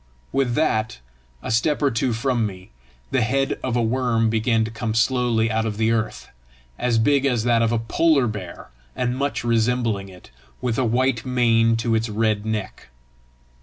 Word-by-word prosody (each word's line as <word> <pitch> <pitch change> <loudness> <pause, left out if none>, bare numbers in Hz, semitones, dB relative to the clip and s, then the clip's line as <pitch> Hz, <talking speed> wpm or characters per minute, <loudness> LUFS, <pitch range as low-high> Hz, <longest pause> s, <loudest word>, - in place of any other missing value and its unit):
With 135 -3 0
that, 110 -8 0 0.5
a - - -4
step 145 +7 +1
or 140 -2 +2
two 120 +2 0
from 120 +1 0
me, 95 -2 -11 0.4
the - - +2
head 135 +4 0
of 130 -2 -2
a 120 - +2
worm 115 -1 +1
began 115 0 +1
to 110 - -6
come 110 -1 -3
slowly 115 -2 +1
out 110 0 0
of 105 -2 -4
the 110 +1 +2
earth, 110 -2 -2 0.5
as 120 -2 +1
big 140 +5 +3
as 125 -5 +1
that 120 -1 +2
of 115 0 +2
a 120 - +1
polar 140 +5 +2
bear 100 - -6 0.2
and 125 0 -1
much 140 -1 -2
resembling 115 -3 0
it, 90 -7 -15 0.3
with 125 -1 -1
a 130 - +2
white 120 0 +1
mane 115 -3 +2
to 115 0 -1
its 110 0 0
red 110 0 0
neck. 110 -3 -4
115 Hz, 180 wpm, -22 LUFS, 110-125 Hz, 0.5 s, big